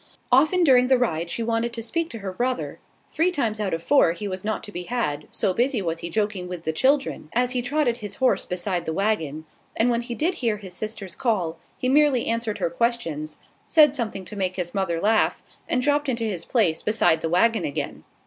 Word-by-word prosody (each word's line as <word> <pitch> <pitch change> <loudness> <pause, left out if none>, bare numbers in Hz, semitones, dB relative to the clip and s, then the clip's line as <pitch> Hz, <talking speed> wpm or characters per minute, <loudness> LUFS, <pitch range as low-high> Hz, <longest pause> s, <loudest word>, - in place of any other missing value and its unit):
Often 310 +8 +5
during 250 -5 +5
the 260 0 +5
ride 170 -9 -1
she 230 - -2
wanted 230 +1 -1
to 230 -1 -5
speak 330 +8 -1
to 230 - -7
her 190 - -3
brother: 250 +5 -2 0.3
three 330 +3 +3
times 230 -11 -1
out 205 -2 -1
of 165 0 -3
four 220 -8 +4
he 205 +4 -5
was 185 -1 -5
not 215 +1 -2
to 210 - -8
be 175 -2 -6
had, 150 -12 -2
so 185 - 0
busy 245 +3 +1
was 165 -3 -2
he 170 - -5
joking 205 -1 -1
with 180 -2 -6
the 160 - -1
children, 270 - +1
as 250 +1 +1
he 250 -1 -1
trotted 245 -1 0
his 205 -4 -6
horse 260 -1 +2
beside 180 -1 -2
the 160 - -2
waggon; 160 -7 -1 0.3
and 240 +2 +3
when 235 0 +1
he 240 0 -5
did 335 +8 +1
hear 225 -4 +1
his 190 -3 -9
sister's 200 -2 -5
call 185 -8 -1 0.2
he 255 - -2
merely 275 -2 +4
answered 230 -2 -1
her 165 - -1
questions, 165 -9 -1 0.3
said 300 -4 +6
something 220 -8 -3
to 210 - -8
make 185 -2 -1
his 175 -2 -3
mother 190 -4 0
laugh, 215 +4 +2 0.3
and 250 - +1
dropped 290 0 +2
into 235 -2 -1
his 200 -7 -3
place 185 -10 +1
beside 215 -6 +2
the 165 - -1
waggon 225 +7 +3
again. 140 - -4
220 Hz, 220 wpm, -24 LUFS, 180-250 Hz, 0.3 s, said